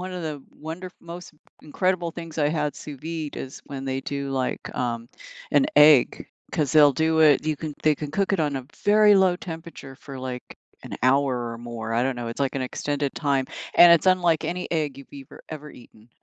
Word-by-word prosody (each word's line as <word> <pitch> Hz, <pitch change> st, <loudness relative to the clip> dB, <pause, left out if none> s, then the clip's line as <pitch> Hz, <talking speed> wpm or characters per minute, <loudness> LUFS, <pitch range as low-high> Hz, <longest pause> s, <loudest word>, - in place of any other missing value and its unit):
one 185 Hz, +1 st, -6 dB
of 180 Hz, -1 st, -5 dB
the 150 Hz, -3 st, -5 dB
wonder 165 Hz, +4 st, -8 dB
most 170 Hz, +1 st, -10 dB, 0.3 s
incredible 180 Hz, +2 st, -1 dB
things 165 Hz, -1 st, -8 dB
I 145 Hz, -1 st, +3 dB
had 150 Hz, -2 st, -1 dB
sous 145 Hz, -3 st, -9 dB
vide 160 Hz, -1 st, -5 dB
is 135 Hz, -, -7 dB
when 135 Hz, -1 st, -6 dB
they 135 Hz, 0 st, -2 dB
do, 140 Hz, 0 st, -4 dB
like, 130 Hz, -1 st, -3 dB
um, 120 Hz, -1 st, -3 dB, 0.4 s
an 275 Hz, -, +4 dB
egg 150 Hz, -4 st, +6 dB, 0.3 s
'cause 150 Hz, -3 st, 0 dB
they'll 150 Hz, -2 st, +7 dB
do 160 Hz, +3 st, +1 dB
it 150 Hz, -2 st, +5 dB
you 155 Hz, -1 st, 0 dB
can 155 Hz, 0 st, -6 dB
they 155 Hz, -1 st, +4 dB
can 150 Hz, 0 st, -6 dB
cook 195 Hz, +3 st, 0 dB
it 195 Hz, -, +1 dB
on 145 Hz, -2 st, 0 dB
a 130 Hz, -1 st, -6 dB, 0.2 s
very 210 Hz, 0 st, +6 dB
low 190 Hz, -2 st, +4 dB
temperature 165 Hz, -6 st, -9 dB
for, 135 Hz, -1 st, -10 dB
like, 130 Hz, -1 st, -7 dB, 0.3 s
an -, -, -7 dB
hour 130 Hz, -2 st, +2 dB
or 115 Hz, -, -8 dB
more, 115 Hz, -1 st, -5 dB
I 120 Hz, -, +2 dB
don't 130 Hz, 0 st, -1 dB
know, 120 Hz, -1 st, -4 dB
it's, 115 Hz, -, -7 dB
like, 135 Hz, -2 st, 0 dB
an 135 Hz, -, -2 dB
extended 145 Hz, +2 st, -3 dB
time, 140 Hz, -3 st, 0 dB, 0.3 s
and 175 Hz, 0 st, +9 dB
it's 170 Hz, +2 st, +3 dB
unlike 175 Hz, -4 st, +3 dB
any 180 Hz, +1 st, -4 dB
egg 150 Hz, -5 st, -2 dB
you've 140 Hz, -, -14 dB
ever 135 Hz, -2 st, -12 dB
ever 150 Hz, -1 st, -8 dB
eaten. 110 Hz, -1 st, -17 dB
150 Hz, 210 wpm, -24 LUFS, 135-165 Hz, 0.4 s, and